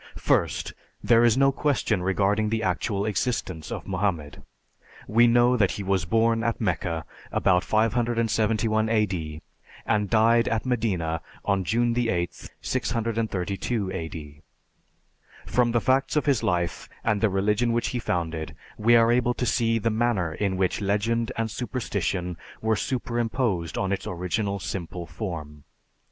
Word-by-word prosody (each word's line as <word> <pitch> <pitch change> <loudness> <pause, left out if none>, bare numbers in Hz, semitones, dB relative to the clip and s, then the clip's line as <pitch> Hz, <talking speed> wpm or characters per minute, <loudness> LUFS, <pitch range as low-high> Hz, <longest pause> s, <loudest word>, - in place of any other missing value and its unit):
First, - - 0 0.3
there 115 0 +5
is 120 0 +4
no 135 0 +5
question 135 -8 0
regarding 100 +3 +1
the 110 0 -1
actual 100 +2 -1
existence 95 -6 -2
of - - -5
Mohammed. 90 -7 -2 0.7
We 115 +2 +5
know 120 +1 +4
that 105 -5 +3
he 100 - -5
was 95 -3 0
born 115 +4 +2
at 115 0 -1
Mecca 85 -5 -1 0.3
about 90 -1 +2
571 110 -1 +1
A.D. 90 -9 -1 0.4
and 105 -2 +1
died 115 +1 +4
at 115 +1 -1
Medina 95 -10 -1 0.2
on 100 -2 +1
June 115 +5 +1
8th, 105 -8 -2
632 115 -4 -2
A.D. 75 -4 -7 1.0
From 120 -1 +2
the 120 - +2
facts 130 +4 +1
of 150 - +2
his 140 -6 +2
life 85 -1 -1
and 105 -2 +1
the 110 - +3
religion 105 +5 +1
which 120 0 0
he 125 - -2
founded 80 -6 -3 0.2
we 115 +3 +5
are 115 0 +5
able 120 0 +2
to 125 - -2
see 115 -1 +2
the 115 +1 0
manner 110 -7 0
in 95 0 -1
which 95 +2 0
legend 115 +4 0
and 115 -1 -1
superstition 100 -8 -3 0.2
were 110 0 +1
superimposed 120 -5 -1
on 95 - -1
its 100 - -2
original 90 +3 -2
simple 90 -2 -5
form. 80 -5 -6
110 Hz, 140 wpm, -25 LUFS, 90-115 Hz, 1.0 s, there